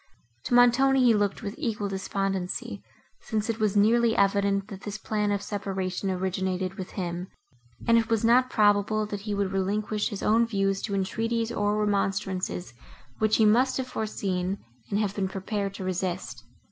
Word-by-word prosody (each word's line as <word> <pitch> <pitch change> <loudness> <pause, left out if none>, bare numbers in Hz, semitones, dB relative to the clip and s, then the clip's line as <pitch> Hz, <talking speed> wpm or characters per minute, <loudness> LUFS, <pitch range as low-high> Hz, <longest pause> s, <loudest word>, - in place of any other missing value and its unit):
To 245 - +1
Montoni 260 +2 +5
he 240 -2 +6
looked 205 -1 0
with 200 -1 -4
equal 220 -8 -2
despondency, 195 -1 -3 0.4
since 220 0 -2
it 225 - -7
was 215 -1 +1
nearly 230 +2 +4
evident, 200 0 +2
that 195 -3 -8
this 205 0 -5
plan 210 0 -1
of 200 0 -1
separation 195 -2 -3
originated 185 0 -1
with 190 -3 -8
him, 175 -1 -4 0.6
and 230 0 +6
it 225 0 -2
was 225 -1 +1
not 250 +2 +5
probable, 210 0 +3
that 205 -1 -5
he 210 0 -3
would 200 -1 -1
relinquish 205 +2 -1
his 205 -4 -6
own 230 +2 +3
views 195 -3 0
to 200 - -2
entreaties, 225 +4 -1
or 210 -2 0
remonstrances, 195 - -1 0.5
which 215 0 +3
he 220 - +4
must 245 +5 +4
have 260 - -1
foreseen 195 -3 -2 0.3
and 200 - 0
have 205 -2 0
been 195 -2 -1
prepared 195 +1 -3
to 190 - -6
resist. 185 0 -3
205 Hz, 170 wpm, -27 LUFS, 195-220 Hz, 0.6 s, he